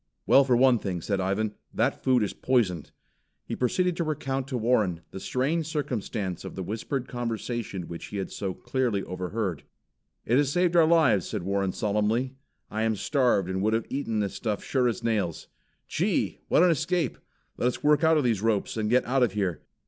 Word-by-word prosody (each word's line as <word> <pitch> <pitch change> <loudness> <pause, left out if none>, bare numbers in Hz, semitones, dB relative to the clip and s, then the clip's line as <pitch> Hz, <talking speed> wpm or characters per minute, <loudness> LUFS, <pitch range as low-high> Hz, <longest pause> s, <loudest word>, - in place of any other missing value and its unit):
"Well, 140 - +6
for 125 -3 +3
one 130 -2 +5
thing," 95 -4 -3
said 95 +3 -1
Ivan, 100 +3 0 0.2
"that - - 0
food 125 -3 +3
is 100 - -2
poisoned." 105 - 0 0.6
He - - -4
proceeded 180 +8 +1
to 170 - 0
recount 135 -4 -2
to 130 -3 -2
Warren, 110 -8 +1
the - - -6
strange 150 - -1
circumstance 110 - -3
of - - -8
the 95 - -4
whispered 115 +7 -3
conversation 115 -4 -3
which 85 - -7
he 105 - -6
had 95 - -4
so 95 -3 -4
clearly 120 -7 -1
overheard. 90 -1 -3 0.6
"It 120 - +3
has 145 -1 +2
saved 175 +1 +2
our 165 -2 +6
lives," 160 - +4
said - - -3
Warren 100 0 0
solemnly. 105 +6 0 0.4
"I 110 - -2
am 110 0 +1
starved 120 - +2
and 95 0 -2
would 110 +2 +2
have 115 0 0
eaten 115 -6 -1
this 100 -2 -2
stuff 105 +1 -3
sure 130 -2 +1
as 115 -5 -2
nails. 105 -8 -1 0.4
Gee, - - 0
what - - +4
an 180 - +5
escape! 160 -1 0 0.4
Let 120 - +1
us 125 - -2
work 150 +2 +4
out 160 0 +5
of 150 - +2
these 115 -5 +1
ropes 110 -1 0
and 105 -1 0
get 125 +2 +3
out 130 +2 +1
of 120 -6 +3
here. 95 -5 -1
115 Hz, 195 wpm, -27 LUFS, 100-135 Hz, 0.6 s, Well